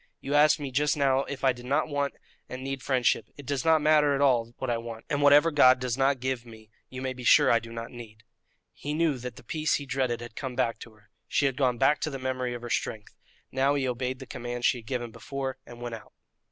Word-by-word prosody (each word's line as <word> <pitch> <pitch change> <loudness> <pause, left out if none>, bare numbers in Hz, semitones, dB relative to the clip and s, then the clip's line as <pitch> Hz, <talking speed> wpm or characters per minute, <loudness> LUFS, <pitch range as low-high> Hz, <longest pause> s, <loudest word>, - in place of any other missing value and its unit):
You 140 - -4
asked 150 +1 +5
me 140 -2 -5
just 145 +3 +1
now 135 -1 +2
if 140 -1 -7
I 135 -1 +4
did 125 0 -11
not 145 +4 +1
want 145 -2 -2 0.3
and 130 +1 -6
need 135 0 -4
friendship; 125 -4 +1
it 145 - -10
does 140 0 -2
not 160 -2 +4
matter 150 -2 +4
at 135 - -1
all 120 -4 +3
what 130 - -4
I 115 - 0
want, 115 -1 -8
and 145 -1 0
whatever 145 +3 +6
God 130 -4 +6
does 125 -2 -2
not 135 0 +2
give 130 -1 -2
me 110 -2 -15 0.2
you 130 0 -7
may 130 0 -2
be 125 -1 -10
sure - - +6
I 115 - +4
do 115 0 -11
not 115 0 -6
need." 110 -3 -11 0.5
He 150 +1 -5
knew 155 -5 +1
that 125 -1 -7
the - - -13
peace 155 +4 0
he 145 - -4
dreaded 130 -2 -1
had 120 -1 -9
come 130 -3 -5
back 120 -2 0
to 115 - -11
her. 105 -1 -26 0.2
She 145 - +1
had 135 -2 +1
gone 125 -3 +1
back 135 +4 +3
to - - -1
the 135 - -5
memory 130 -1 -2
of 120 - -8
her 120 - -6
strength. 110 -2 -3 0.4
Now 135 +2 +2
he 135 -2 0
obeyed 125 +1 -2
the 130 - -9
command 120 0 -5
she 125 - +3
had 110 - -16
given 120 -3 -3
before, 130 +3 -5
and 120 0 -11
went 120 -1 -5
out. 110 - -10
130 Hz, 260 wpm, -27 LUFS, 120-140 Hz, 0.5 s, whatever